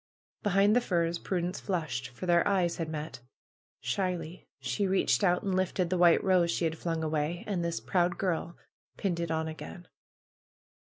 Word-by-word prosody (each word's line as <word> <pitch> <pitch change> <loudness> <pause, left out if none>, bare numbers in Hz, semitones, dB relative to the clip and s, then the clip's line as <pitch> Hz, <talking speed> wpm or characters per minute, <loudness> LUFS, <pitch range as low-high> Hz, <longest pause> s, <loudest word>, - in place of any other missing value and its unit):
Behind 205 +1 +3
the 245 - +4
firs 170 -5 0
Prudence 180 0 -2
flushed, 160 -9 -2
for 130 +9 -8
their 170 -1 +4
eyes 185 -4 +1
had 165 -2 -3
met. 155 -3 -5 0.6
Shyly 175 - -3
she 130 +10 -1
reached 185 -9 +2
out 180 0 +3
and 195 -2 -1
lifted 185 -1 0
the 185 - +2
white 175 -1 +6
rose 185 -3 +3
she 170 - 0
had 160 0 0
flung 165 -2 -2
away. 155 +2 -1
And 190 -5 -1
this 170 0 -1
proud 180 0 +1
girl 170 -2 -2 0.4
pinned 180 -4 -1
it 170 -1 -2
on 160 0 -1
again. 160 +2 -8
175 Hz, 170 wpm, -30 LUFS, 160-185 Hz, 0.6 s, white